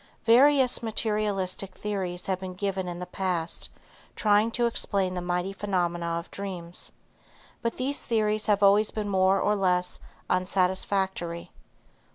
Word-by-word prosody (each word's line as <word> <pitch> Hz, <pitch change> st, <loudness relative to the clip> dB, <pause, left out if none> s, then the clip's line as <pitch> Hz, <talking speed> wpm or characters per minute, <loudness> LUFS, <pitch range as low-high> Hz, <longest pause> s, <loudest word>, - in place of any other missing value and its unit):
Various 260 Hz, +2 st, +5 dB
materialistic 210 Hz, -4 st, -1 dB
theories 185 Hz, -4 st, -3 dB
have 190 Hz, -1 st, -1 dB
been 185 Hz, -1 st, -6 dB
given 190 Hz, -1 st, -2 dB
in 175 Hz, -1 st, -4 dB
the 180 Hz, -, -5 dB
past, 180 Hz, -2 st, -2 dB, 0.5 s
trying 210 Hz, +1 st, +3 dB
to 240 Hz, -, +1 dB
explain 200 Hz, -5 st, +1 dB
the 180 Hz, -, -3 dB
mighty 180 Hz, +2 st, -1 dB
phenomena 175 Hz, -4 st, -1 dB
of 170 Hz, -, -7 dB
dreams, 180 Hz, -3 st, -5 dB, 0.7 s
but 230 Hz, -, -2 dB
these 270 Hz, +3 st, -1 dB
theories 215 Hz, -2 st, 0 dB
have 205 Hz, -1 st, +3 dB
always 205 Hz, +2 st, +5 dB
been 215 Hz, -1 st, -4 dB
more 190 Hz, 0 st, +3 dB
or 210 Hz, +2 st, +2 dB
less 180 Hz, -2 st, +1 dB, 0.3 s
unsatisfactory. 185 Hz, -1 st, -1 dB
195 Hz, 135 wpm, -27 LUFS, 180-210 Hz, 0.7 s, Various